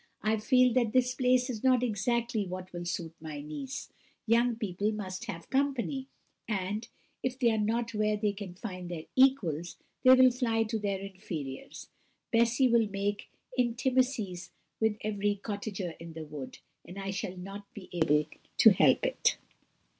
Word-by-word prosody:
I 215 +1 +2
feel 250 +3 +4
that 235 -3 +2
this 250 -1 +3
place 255 -1 +3
is 235 -5 -5
not 255 -2 +4
exactly 235 -1 0
what 185 0 -7
will 175 0 -5
suit 170 -1 -3
my 155 -2 -6
niece 155 - -6 0.3
young 235 +1 +3
people 210 -2 -1
must 190 -3 -5
have 165 -2 -6
company; 270 -1 0 0.4
and 210 +1 -2 0.3
if 255 0 -2
they 240 -3 +3
are 220 - 0
not 230 +2 0
where 215 0 +1
they 210 0 +1
can 195 -3 -8
find 185 -3 -6
their 165 -3 -5
equals, 185 - +3 0.3
they 255 0 +9
will 255 0 +7
fly 235 -3 +1
to 220 0 -2
their 200 -2 -1
inferiors. 185 -8 -7 0.4
Bessy 235 +3 +4
will 230 -3 +3
make 200 +1 -2 0.3
intimacies 240 -6 0 0.3
with 220 -1 +2
every 205 -1 0
cottager 200 -3 -4
in 165 0 -9
the 160 -1 -7
wood, 150 -3 -8 0.3
and 180 - -11
I 195 0 -3
shall 190 -1 -4
not 195 +2 -8
be 195 -3 -9
able 150 -3 +3 0.3
to - - +9
help - - +4
it." - - +1
210 Hz, 160 wpm, -30 LUFS, 185-240 Hz, 0.4 s, they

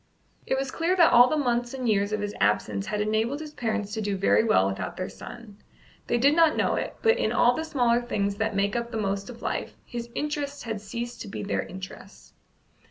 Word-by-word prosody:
It 265 - +1
was 270 -1 -2
clear 335 +3 +1
that 340 -3 +5
all 245 +1 +8
the 310 - +1
months 245 -2 0
and 255 -2 -3
years 205 -1 +2
of 215 -1 -1
his 205 0 -3
absence 100 -1 +1
had 210 - -1
enabled 220 +6 0
his 305 -1 -8
parents 220 -5 -2
to 220 - -2
do 205 -2 -1
very 195 - +4
well 215 - +4
without 95 0 -4
their 185 - -3
son. 225 -4 -11 0.5
They - - +2
did 280 +5 +4
not 330 -2 +4
know - - +2
it, - - -3
but 455 +1 +4
in - - +1
all 245 - +4
the 315 - -3
smaller 245 -6 +2
things 200 -4 -1
that 220 -1 -1
make 200 0 +1
up 235 0 -2
the 225 - -4
most 200 -1 -2
of 240 -1 -10
life, - - -3
his 235 -1 -6
interests 290 -1 -3
had 225 -3 -4
ceased 235 +3 -6
to - - -6
be 195 - -5
their 200 - -1
interests. 190 +1 -10
235 Hz, 230 wpm, -26 LUFS, 205-260 Hz, 0.5 s, all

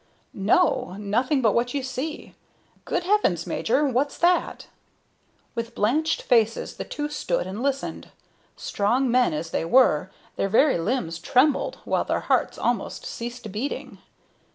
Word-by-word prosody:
"No. 200 - +2
Nothing 245 +7 0
but 220 - +4
what 245 +3 0
you 275 - -1
see. 265 +4 -5 0.5
Good - - -1
heavens, 350 - +2
major! 260 +6 +1
What's 275 +2 0
that?" 350 +1 +1 0.9
With 230 0 -5
blanched 305 +10 +1
faces 225 -2 +1
the - - -3
two 295 0 -4
stood 300 +11 -2
and 195 +5 -5
listened. 275 0 -3 0.5
Strong 240 +5 0
men 250 0 +3
as 160 +2 -4
they - - -1
were, 185 - +4 0.3
their 195 - 0
very 265 - +4
limbs 165 -4 -2
trembled, 265 - +2
while - - +1
their - - -1
hearts - - 0
almost - - -2
ceased 235 -2 -6
beating. 235 +8 -5
245 Hz, 140 wpm, -24 LUFS, 210-280 Hz, 0.9 s, but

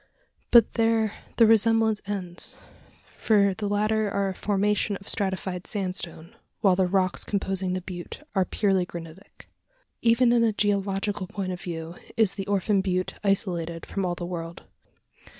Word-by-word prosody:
But 235 -2 +6
there 225 -2 +2 0.2
the 230 - +7
resemblance 225 -1 +3
ends; 185 -4 -4 0.6
for 200 -3 +3
the 205 +1 -3
latter 215 +1 +1
are 200 0 0
a - - -3
formation 205 +1 0
of 195 - -17
stratified 190 -2 -2
sandstone, 180 -4 -4 0.3
while 195 -4 +5
the 185 0 +2
rocks 185 0 +1
composing 190 -2 -1
the 185 - -2
butte 180 - -8
are 190 -3 +3
purely 195 -1 +1
granitic! 170 +2 -11 0.5
Even 235 +1 +4
in 235 -1 +4
a 225 -2 +2
geological 200 -1 0
point 195 -2 -4
of 180 - -6
view, 165 -1 -6 0.2
is 215 -4 +3
the 195 -1 -5
Orphan 200 0 +2
Butte 185 -1 -1
isolated 170 -4 0
from 195 - -3
all 175 -1 -1
the 175 - -5
world. 170 -1 -6
195 Hz, 150 wpm, -26 LUFS, 180-210 Hz, 0.6 s, the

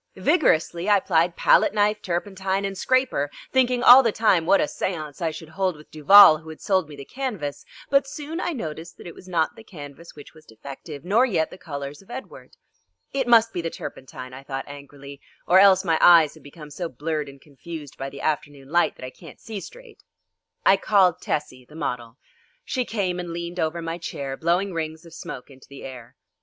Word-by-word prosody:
Vigorously 185 - +1
I 205 -1 +5
plied 170 -2 +1
palette - - +3
knife, 210 0 +1
turpentine, 190 +2 -2
and 195 0 -4
scraper, 255 - 0 0.2
thinking 250 -2 +2
all 250 +2 +10
the 230 -4 +1
time 190 -7 +2
what 195 +1 +5
a - - +3
séance 155 -1 -4
I 165 - 0
should 160 0 -9
hold 185 0 -1
with 150 - -17
Duval 155 +1 +8
who 160 0 -13
had 160 - -10
sold 185 -5 0
me 150 - -10
the 140 -1 -10
canvas; 210 - -5 0.3
but 275 0 +3
soon 300 +4 -6
I 350 - -2
noticed 165 - -7
that - - -13
it 170 - -8
was 185 - -15
not 165 -3 0
the 225 - -13
canvas 150 -4 -12
which 145 - -13
was 155 -1 -18
defective 140 +6 -10
nor 210 +7 +3
yet 165 -9 -1
the - - -11
colours 145 -4 -7
of 195 - -23
Edward. 260 +2 -10 0.6
"It 265 -2 -1
must 230 -1 +5
be 175 - -3
the 165 - -3
turpentine," 130 -4 -9
I 130 - -9
thought 135 -1 -6
angrily, 140 0 -12 0.2
"or 185 +2 +5
else 190 -1 +5
my 165 -2 +1
eyes 165 -4 +7
have - - -17
become 150 +1 -13
so 170 +3 -5
blurred 150 +2 -4
and 140 0 -14
confused 150 +1 -10
by 135 +1 -6
the 140 - -10
afternoon 145 -3 -3
light 170 +2 +2
that - - -9
I 130 - -8
can't 160 +2 -15
see 220 -3 -7
straight." 485 - -13 0.6
I 195 - +6
called 190 -4 +2
Tessie, 130 -4 -4
the 150 - -15
model. 120 -6 -5 0.5
She 255 -3 -2
came 190 -6 -2
and 175 -1 -5
leaned 170 +1 -6
over 165 +1 -2
my 165 +1 -4
chair 140 -5 -5
blowing 175 +6 0
rings 160 0 -5
of 165 - -14
smoke 130 -4 -9
into 130 -1 -17
the 140 - -11
air. 125 -3 -10
170 Hz, 205 wpm, -23 LUFS, 145-195 Hz, 0.6 s, all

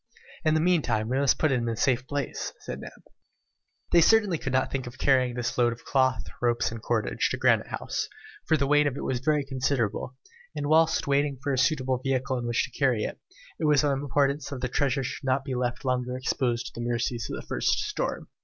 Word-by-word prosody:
"In 155 -1 +3
the - - +3
meantime, 155 -11 +1
we 130 +2 +1
must 140 -2 +3
put 155 - +2
it 130 - +2
in 115 0 -2
a 115 - -2
safe 130 -1 +1
place," 145 -1 -3
said - - -6
Neb. - - -11 0.9
They 170 - +6
certainly 205 -3 +4
could 135 - -3
not 130 +1 +1
think 130 -2 -3
of 120 +2 -9
carrying 130 -3 +2
this 120 0 -2
load 120 -1 +4
of 115 - -14
cloth, 130 -2 +1 0.2
ropes, 120 -1 +1
and 115 -1 -7
cordage, - - 0
to - - -2
Granite - - +3
House, - - -3 0.4
for 160 - +4
the 140 - +1
weight 145 +1 +4
of 140 -1 -2
it - - -5
was 130 -2 -1
very 150 +2 +1
considerable, 130 -3 -1 0.4
and 145 -1 -3
whilst 160 +2 +3
waiting 140 0 +1
for 140 -1 0
a - - 0
suitable 130 -3 +1
vehicle 130 -1 -1
in 120 - -4
which 120 0 +1
to - - -6
convey 130 -6 +2
it, - - -4 0.4
it 160 - 0
was 150 -1 +4
of 145 - +2
importance 140 +1 0
that 140 -3 -6
this 125 -1 -2
treasure 135 0 +1
should 130 - -5
not 135 +1 0
be 135 - -3
left 120 -1 -2
longer 125 0 -1
exposed 125 -2 -1
to - - -6
the 120 - -5
mercies 120 0 -2
of - - -4
the - - -10
first - - 0
storm. - - -3
130 Hz, 230 wpm, -27 LUFS, 125-145 Hz, 0.9 s, They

